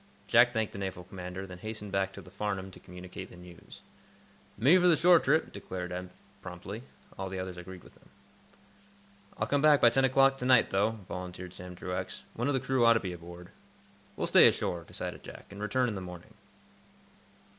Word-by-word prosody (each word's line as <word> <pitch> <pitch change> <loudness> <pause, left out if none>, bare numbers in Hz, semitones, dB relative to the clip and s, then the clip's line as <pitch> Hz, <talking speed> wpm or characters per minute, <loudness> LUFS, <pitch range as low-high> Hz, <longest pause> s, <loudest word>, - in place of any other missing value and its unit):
Jack 120 +1 +5
thanked 110 -3 -1
the - - -7
naval 95 -2 -4
commander, 90 +1 -7
then 95 -2 -10
hastened 105 0 -6
back 95 -1 0
to - - -10
the 90 - -15
"Farnum" 95 -2 -3
to - - -13
communicate 90 +1 -9
the - - -13
news. 90 -1 -13 0.8
"Me 135 - +6
for 180 - +4
the 165 -3 +5
shore 175 +1 +6
trip," 155 +3 +1
declared 90 -1 -6
Eph, 90 0 -5 0.3
promptly. 95 +4 -7 0.4
All 95 0 -3
the 95 - -5
others 95 -1 -5
agreed 90 +1 -10
with - - -17
him. - - -23 1.3
"I'll 110 - 0
come 140 +4 +1
back 150 -1 +6
by 120 -1 +6
ten 135 +3 +2
o'clock 135 +1 +4
to 125 - -3
night, 125 -3 +5
though," 105 +3 +1
volunteered 90 0 -7
Sam 90 0 -8
Truax. 90 +1 -5
"One 120 +4 -2
of 145 - +2
the - - +2
crew 130 -1 +1
ought 115 0 +7
to 115 - +2
be 95 -4 -4
aboard." 85 +1 -11 0.7
"We'll - - -1
stay - - +7
ashore," 85 -2 -1
decided - - -6
Jack, - - -12
"and 100 +1 -9
return 125 +4 +1
in 115 - -2
the 95 - -5
morning." 90 -1 -10
95 Hz, 200 wpm, -30 LUFS, 90-120 Hz, 1.3 s, ought